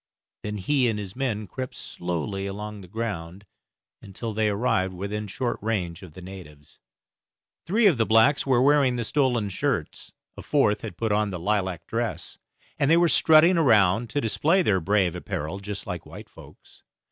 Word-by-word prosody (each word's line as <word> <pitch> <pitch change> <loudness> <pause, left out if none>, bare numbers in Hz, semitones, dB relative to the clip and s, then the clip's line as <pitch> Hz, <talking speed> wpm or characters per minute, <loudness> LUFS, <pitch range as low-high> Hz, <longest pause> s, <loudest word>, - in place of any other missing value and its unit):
Then 105 0 -4
he 130 +5 +1
and 110 - -2
his 100 -2 -7
men 120 -5 -2
crept 130 +6 -6
slowly 90 +3 -4
along 105 +1 -6
the 90 - -12
ground 100 -3 -5 0.6
until 110 +3 -6
they 110 0 +1
arrived 100 -4 0
within 105 +3 -4
short 120 +4 -3
range 95 -6 -2
of 90 -5 -12
the 90 - -11
natives. 85 -6 -12 0.9
Three 215 +6 +2
of 170 - +4
the 115 - +3
blacks 115 +6 +4
were 130 -2 +2
wearing 140 -3 +4
the 120 - -2
stolen 125 -4 0
shirts, 95 - -3 0.2
a - - -9
fourth 135 -8 +1
had 85 - -7
put 115 -2 -1
on 105 0 +1
the 95 - -4
lilac 95 -2 -1
dress, 115 0 -4 0.4
and 140 - +2
they 165 - +6
were 170 0 +4
strutting 165 +3 +5
around 110 - +3
to 145 - -1
display 160 - +2
their 95 - +2
brave 95 -1 +1
apparel 90 +1 -4
just 100 0 -7
like - - -5
white - - -11
folks. - - -17
105 Hz, 175 wpm, -25 LUFS, 95-125 Hz, 0.9 s, they